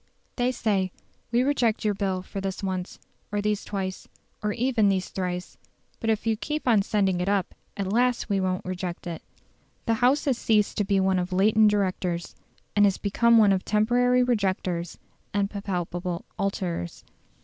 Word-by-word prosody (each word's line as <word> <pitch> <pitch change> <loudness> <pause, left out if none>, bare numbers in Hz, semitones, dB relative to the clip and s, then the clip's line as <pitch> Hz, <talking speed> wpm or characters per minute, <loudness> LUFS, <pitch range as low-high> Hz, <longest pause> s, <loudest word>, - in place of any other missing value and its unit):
They 250 0 +1
say, 200 -6 0 0.4
We 240 +1 +3
reject 245 -6 +1
your 210 - +3
Bill 190 -2 -2
for 195 +1 -6
this 195 +1 -4
once 185 -1 -3 0.3
or 205 - 0
these 210 0 0
twice, 190 -2 -4 0.3
or 210 0 0
even 235 -2 +2
these 190 -1 0
thrice: 180 -1 -4 0.4
but 225 - -2
if 220 0 0
you 225 -1 +2
keep 300 +6 -4
on 225 -4 +5
sending 195 -3 +1
it 180 - 0
up, 200 -2 0 0.2
at 195 -1 -2
last 245 +1 +2
we 200 -3 +1
won't 185 -1 -1
reject 180 -1 -4
it. 170 -2 -5 0.6
The 230 - +2
House 260 +4 +3
has 265 -4 +1
ceased 210 -2 +2
to - - +3
be 195 -1 +2
one 190 -1 +2
of 180 +1 -3
latent 210 +3 +5
directors, 185 -4 -1 0.4
and 205 0 +6
has 195 - 0
become 235 +3 +3
one 210 -3 +6
of 185 - 0
temporary 245 +4 +3
rejectors 190 -7 -1 0.4
and 200 0 +1
palpable 180 -3 -3
alterers. 180 - -3
200 Hz, 170 wpm, -26 LUFS, 185-220 Hz, 0.6 s, and